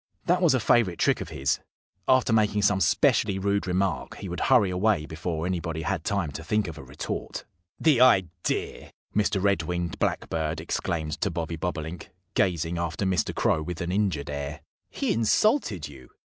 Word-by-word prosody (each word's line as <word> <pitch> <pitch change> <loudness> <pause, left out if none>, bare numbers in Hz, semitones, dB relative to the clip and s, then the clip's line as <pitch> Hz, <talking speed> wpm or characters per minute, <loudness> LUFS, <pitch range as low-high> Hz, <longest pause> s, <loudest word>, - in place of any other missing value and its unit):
That 180 +1 +2
was 165 -7 +4
a - - +2
favorite 110 -5 +3
trick - - +2
of - - -6
his. 70 +2 0 0.5
After 130 -3 +4
making 105 -2 +2
some 100 -1 +3
specially 95 +3 +3
rude 100 +1 0
remark 95 +1 -1
he 95 - -7
would 90 - -4
hurry 115 -8 +4
away 90 -3 +1
before 80 +1 -4
anybody 85 -3 -2
had 80 - -2
time 100 -7 -1
to - - -7
think 105 -2 0
of 80 -3 -7
a - - -9
retort. 65 +2 -5 0.3
"The 150 -7 +4
idea!" 90 -9 +1 0.2
Mr. 100 -1 +2
Red 100 +1 +2
winged 85 -1 -3
Blackbird 80 -1 -1
exclaimed 80 -4 -3
to - - +1
Bobby 85 0 -3
Bobolink, 80 0 -5 0.2
gazing 85 -3 0
after 85 +3 -2
Mr. 95 -3 0
Crow 80 - +2
with 85 +2 -5
an 85 +1 -2
injured 90 -8 0
air. 70 +1 -5 0.3
"He - - -1
insulted 115 - +2
you!" 65 -3 -13
90 Hz, 175 wpm, -26 LUFS, 80-100 Hz, 0.5 s, was